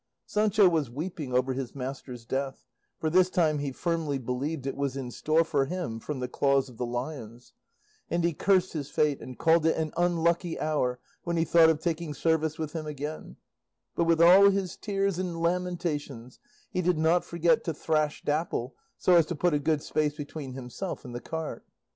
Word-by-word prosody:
Sancho 210 Hz, -1 st, +3 dB
was 160 Hz, -7 st, +1 dB
weeping 150 Hz, +1 st, -5 dB
over 130 Hz, +1 st, +1 dB
his 130 Hz, -1 st, -5 dB
master's 130 Hz, -2 st, -6 dB
death, 135 Hz, +2 st, -3 dB, 0.3 s
for 160 Hz, -, -2 dB
this 180 Hz, +3 st, +4 dB
time 160 Hz, -5 st, +2 dB
he 140 Hz, -1 st, -2 dB
firmly 160 Hz, -1 st, -1 dB
believed 130 Hz, +4 st, -3 dB
it 135 Hz, -, -2 dB
was 140 Hz, -1 st, -2 dB
in 125 Hz, -2 st, -5 dB
store 155 Hz, +6 st, +2 dB
for 145 Hz, -4 st, +1 dB
him 155 Hz, -8 st, -4 dB
from 140 Hz, +3 st, -5 dB
the 125 Hz, -, -2 dB
claws 135 Hz, +1 st, +1 dB
of 120 Hz, -, -15 dB
the 125 Hz, -, -2 dB
lions; 120 Hz, -1 st, -6 dB, 0.6 s
and 170 Hz, 0 st, 0 dB
he 170 Hz, 0 st, +2 dB
cursed 185 Hz, +3 st, +2 dB
his 145 Hz, -3 st, -4 dB
fate 150 Hz, -2 st, +1 dB
and 130 Hz, -, -9 dB
called 165 Hz, 0 st, +4 dB
it 160 Hz, -, +2 dB
an 160 Hz, -1 st, -2 dB
unlucky 170 Hz, 0 st, +1 dB
hour 125 Hz, -5 st, 0 dB, 0.2 s
when 170 Hz, 0 st, -1 dB
he 165 Hz, -, +2 dB
thought 165 Hz, 0 st, +6 dB
of 160 Hz, -2 st, +2 dB
taking 160 Hz, -2 st, -2 dB
service 160 Hz, +1 st, +1 dB
with 155 Hz, -2 st, -4 dB
him 160 Hz, -2 st, -4 dB
again; 150 Hz, +1 st, -6 dB, 0.6 s
but 170 Hz, -, +1 dB
with 165 Hz, -1 st, +3 dB
all 185 Hz, +4 st, +8 dB
his 195 Hz, -2 st, -1 dB
tears 195 Hz, -3 st, -1 dB
and 175 Hz, -3 st, -3 dB
lamentations 170 Hz, -8 st, -2 dB, 0.3 s
he 180 Hz, -, 0 dB
did 180 Hz, -1 st, +1 dB
not 160 Hz, +3 st, +3 dB
forget 170 Hz, +7 st, +2 dB
to 165 Hz, -, -1 dB
thrash 155 Hz, -1 st, -1 dB
Dapple 145 Hz, -5 st, -1 dB, 0.2 s
so 180 Hz, -, +3 dB
as 165 Hz, -2 st, +4 dB
to 175 Hz, -, -3 dB
put 175 Hz, +2 st, +1 dB
a 150 Hz, -, +2 dB
good 155 Hz, 0 st, 0 dB
space 150 Hz, -1 st, 0 dB
between 145 Hz, -2 st, -7 dB
himself 135 Hz, +8 st, -6 dB
and 125 Hz, -, -8 dB
the 120 Hz, -, -5 dB
cart. 160 Hz, -1 st, -5 dB
155 Hz, 195 wpm, -28 LUFS, 135-170 Hz, 0.6 s, all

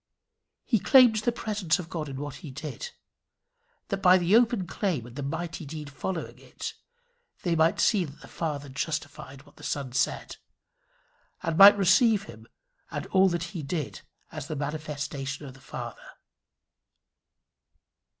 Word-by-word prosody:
He 225 Hz, -, +2 dB
claimed 250 Hz, 0 st, +6 dB
the 215 Hz, +3 st, +1 dB
presence 210 Hz, -7 st, 0 dB
of 180 Hz, -3 st, -6 dB
God 155 Hz, -3 st, -4 dB
in 135 Hz, -, -6 dB
what 145 Hz, -1 st, -5 dB
he 155 Hz, -, -9 dB
did, 150 Hz, -, -6 dB, 1.0 s
that 195 Hz, -1 st, -2 dB
by 185 Hz, 0 st, +7 dB
the 180 Hz, +3 st, +3 dB
open 230 Hz, -4 st, +3 dB
claim 170 Hz, -, -2 dB
and 120 Hz, 0 st, -12 dB
the 145 Hz, -, -4 dB
mighty 165 Hz, +4 st, -4 dB
deed 150 Hz, -1 st, -7 dB
following 165 Hz, +4 st, -5 dB
it -, -, -7 dB, 0.7 s
they 175 Hz, -2 st, +1 dB
might 160 Hz, +1 st, +3 dB
see 200 Hz, -6 st, +3 dB
that 145 Hz, -1 st, -12 dB
the -, -, -12 dB
Father 150 Hz, -4 st, -4 dB
justified 140 Hz, -1 st, -5 dB
what -, -, -22 dB
the -, -, -14 dB
Son 140 Hz, -3 st, -3 dB
said, 130 Hz, -, -1 dB, 1.1 s
and 165 Hz, -2 st, -1 dB
might 200 Hz, +4 st, +10 dB
receive 200 Hz, +2 st, +4 dB
him 110 Hz, -, -12 dB, 0.4 s
and -, -, -4 dB
all 190 Hz, 0 st, +5 dB
that 170 Hz, -1 st, -2 dB
he 170 Hz, -, -4 dB
did 150 Hz, 0 st, -4 dB, 0.3 s
as 150 Hz, -3 st, -6 dB
the 155 Hz, -, -4 dB
manifestation 145 Hz, -1 st, -4 dB
of 135 Hz, -, -9 dB
the 135 Hz, -, -17 dB
Father. -, -, -8 dB
160 Hz, 155 wpm, -27 LUFS, 145-190 Hz, 1.1 s, might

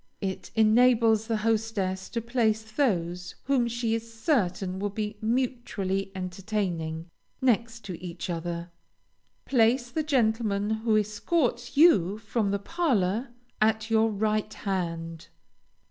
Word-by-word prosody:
It 190 Hz, -2 st, -4 dB
enables 225 Hz, 0 st, +4 dB
the 225 Hz, -2 st, 0 dB
hostess 215 Hz, -4 st, -1 dB
to 230 Hz, -, -2 dB
place 225 Hz, -2 st, +1 dB
those 180 Hz, -, -1 dB
whom 260 Hz, -3 st, +2 dB
she 235 Hz, -1 st, -1 dB
is 230 Hz, 0 st, -3 dB
certain 195 Hz, -, 0 dB
will 205 Hz, +1 st, -1 dB
be 210 Hz, +1 st, -4 dB
mutually 220 Hz, -5 st, -1 dB
entertaining, 180 Hz, -4 st, -3 dB, 0.3 s
next 230 Hz, -3 st, 0 dB
each 180 Hz, -1 st, -6 dB
other. 170 Hz, 0 st, -4 dB, 0.7 s
Place 240 Hz, 0 st, +2 dB
the 315 Hz, -, 0 dB
gentleman 220 Hz, -7 st, +1 dB
who 220 Hz, 0 st, +2 dB
escorts 240 Hz, -, -1 dB
you 210 Hz, -, +5 dB
from 215 Hz, -1 st, -1 dB
the 200 Hz, -, +1 dB
parlor 235 Hz, -, 0 dB, 0.3 s
at 220 Hz, +1 st, +2 dB
your 225 Hz, 0 st, +4 dB
right 215 Hz, 0 st, 0 dB
hand. 165 Hz, -5 st, -4 dB
220 Hz, 115 wpm, -27 LUFS, 190-235 Hz, 0.7 s, you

